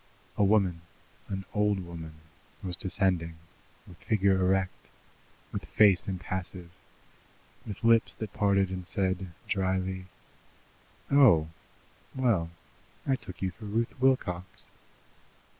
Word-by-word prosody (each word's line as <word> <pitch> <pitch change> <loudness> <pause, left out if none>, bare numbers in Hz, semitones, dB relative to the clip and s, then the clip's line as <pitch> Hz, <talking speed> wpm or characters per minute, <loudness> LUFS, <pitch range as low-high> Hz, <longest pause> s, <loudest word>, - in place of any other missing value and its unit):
A - - +2
woman, 95 -4 +3 0.5
an 95 -1 -4
old 105 -2 +2
woman, 85 -3 -8 0.5
was 90 -2 -1
descending, 90 -4 0 0.5
with 90 - -14
figure 100 -3 +2
erect, 95 0 0 0.6
with 100 -4 -4
face 95 +3 +4
impassive, 90 -2 -5 1.0
with 105 -1 -7
lips 115 -1 +4
that 105 -2 -6
parted 100 -2 +2
and 90 -1 -4
said 95 -2 -1 0.2
dryly: 95 -1 -1 1.0
"Oh! 110 - +6 0.7
Well, 115 -11 +2 0.6
I 135 - +2
took 95 -7 -8
you 95 - 0
for 105 +5 -12
Ruth 115 +3 -1
Wilcox." 95 -9 0
95 Hz, 110 wpm, -29 LUFS, 90-105 Hz, 1.0 s, Oh